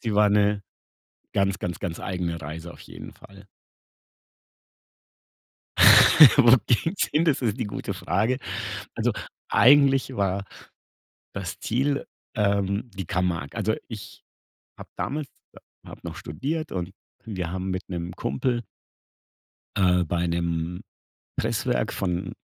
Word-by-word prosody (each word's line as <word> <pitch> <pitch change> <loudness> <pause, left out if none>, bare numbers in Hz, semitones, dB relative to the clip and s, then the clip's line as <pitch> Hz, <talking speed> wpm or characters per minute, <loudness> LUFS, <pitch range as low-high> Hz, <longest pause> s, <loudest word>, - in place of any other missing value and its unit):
Sie 110 -3 -2
war 105 0 +5
'ne 105 0 +2 0.7
ganz, 100 0 +1
ganz, 90 -3 -4
ganz 85 -4 -5
eigene 90 -3 -3
Reise 80 +3 -7
auf - - -14
jeden - - -11
Fall. 100 +1 -16 2.9
Wo 125 -2 +8
ging's 160 - +1
hin, 155 +3 +2
das 155 -5 +2
ist 110 -4 -1
die - - -1
gute 100 -1 -5
Frage. 105 +7 0 0.6
Also - - 0 0.4
eigentlich 135 0 +5
war 100 0 0 0.9
das 95 -4 -5
Ziel, 140 +5 -1 0.3
ähm, 100 +1 0
die 95 -3 -6
Camargue. 90 -4 -2
Also 110 0 0
ich 110 -3 -9 0.6
habe - - -11
damals 145 +1 -3 0.3
ha - - -12 0.3
habe - - -12
noch - - -6
studiert 155 - -4
und 90 0 -4 0.3
und 110 -3 -6
wir 85 -2 -3
haben 95 +1 -3
mit 95 +1 -4
'nem 85 -1 -4
Kumpel 120 +1 -1 1.1
äh, 90 -2 +3
bei 85 +2 -1
'nem 85 0 -2 0.6
Presswerk - - -1
von, 90 -2 -2
100 Hz, 125 wpm, -25 LUFS, 90-120 Hz, 2.9 s, Wo